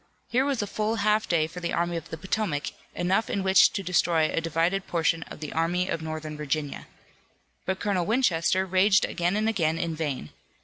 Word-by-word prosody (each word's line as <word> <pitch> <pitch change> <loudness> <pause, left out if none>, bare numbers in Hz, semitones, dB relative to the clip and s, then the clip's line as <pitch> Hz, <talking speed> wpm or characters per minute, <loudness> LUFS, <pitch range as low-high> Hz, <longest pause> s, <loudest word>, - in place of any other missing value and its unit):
Here 255 +3 +3
was 275 -6 0
a - - -2
full 215 +2 -1
half 215 0 +1
day 165 -3 +3
for 170 +3 -8
the 170 -1 -3
Army 170 0 0
of 165 - -6
the 160 - -6
Potomac, 180 -3 -2 0.2
enough 190 +5 +1
in 200 - -1
which 190 0 +6
to 195 - -3
destroy 170 -3 +2
a - - 0
divided 165 +4 0
portion 165 -1 +1
of - - -10
the 150 - -5
Army 175 +3 0
of 165 - -2
Northern 155 -1 -5
Virginia. 150 -1 -3 0.8
But 190 +1 -1
Colonel 190 -4 0
Winchester 190 -6 +2
raged 190 +2 +4
again 175 +2 -1
and 215 +1 +1
again 165 -7 +1
in 165 -1 -2
vain. 145 - -4
175 Hz, 195 wpm, -26 LUFS, 160-200 Hz, 0.8 s, which